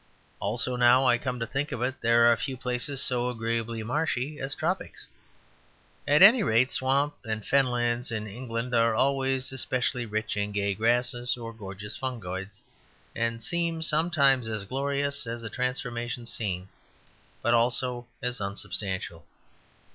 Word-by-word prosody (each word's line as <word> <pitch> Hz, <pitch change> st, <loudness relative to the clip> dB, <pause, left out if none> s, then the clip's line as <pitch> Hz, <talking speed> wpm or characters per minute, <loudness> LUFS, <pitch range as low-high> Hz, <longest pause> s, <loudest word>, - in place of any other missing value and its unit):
Also, 120 Hz, +5 st, -1 dB
now 125 Hz, +2 st, +5 dB
I 120 Hz, -1 st, +4 dB
come 125 Hz, -1 st, -3 dB
to 115 Hz, -, -1 dB
think 135 Hz, +5 st, -3 dB
of 120 Hz, -3 st, -3 dB
it, 130 Hz, +1 st, -2 dB
there 115 Hz, 0 st, +5 dB
are 120 Hz, 0 st, +6 dB
few 130 Hz, +4 st, -4 dB
places 125 Hz, +2 st, -1 dB
so 125 Hz, -1 st, 0 dB
agreeably 115 Hz, -1 st, -2 dB
marshy 145 Hz, +2 st, -1 dB
as 135 Hz, +1 st, -3 dB
tropics. 180 Hz, +4 st, -3 dB, 1.0 s
At 150 Hz, +5 st, +6 dB
any 225 Hz, +5 st, +9 dB
rate 130 Hz, -, +3 dB
swamp 140 Hz, +3 st, +1 dB
and 110 Hz, -2 st, -3 dB
fenlands 120 Hz, -2 st, +1 dB
in 110 Hz, -1 st, -3 dB
England 115 Hz, +2 st, -5 dB
are 115 Hz, -1 st, +3 dB
always 135 Hz, +1 st, +1 dB
especially 125 Hz, -2 st, -1 dB
rich 105 Hz, 0 st, -2 dB
in 105 Hz, 0 st, -2 dB
gay 100 Hz, 0 st, 0 dB
grasses 120 Hz, +3 st, 0 dB
or 115 Hz, -1 st, -7 dB
gorgeous 105 Hz, -1 st, -7 dB
fungoids; 95 Hz, -6 st, -5 dB, 0.5 s
and 115 Hz, 0 st, -1 dB
seem 170 Hz, +2 st, -1 dB
sometimes 150 Hz, -6 st, +3 dB
as 110 Hz, -2 st, -3 dB
glorious 140 Hz, +2 st, 0 dB
as 115 Hz, 0 st, -5 dB
a 115 Hz, -, -5 dB
transformation 125 Hz, -2 st, -2 dB
scene; 95 Hz, -5 st, -3 dB, 0.7 s
but 120 Hz, -, +3 dB
also 120 Hz, +1 st, +1 dB, 0.2 s
as 125 Hz, -2 st, -1 dB
unsubstantial. 95 Hz, -3 st, -4 dB
120 Hz, 145 wpm, -27 LUFS, 115-135 Hz, 1.0 s, any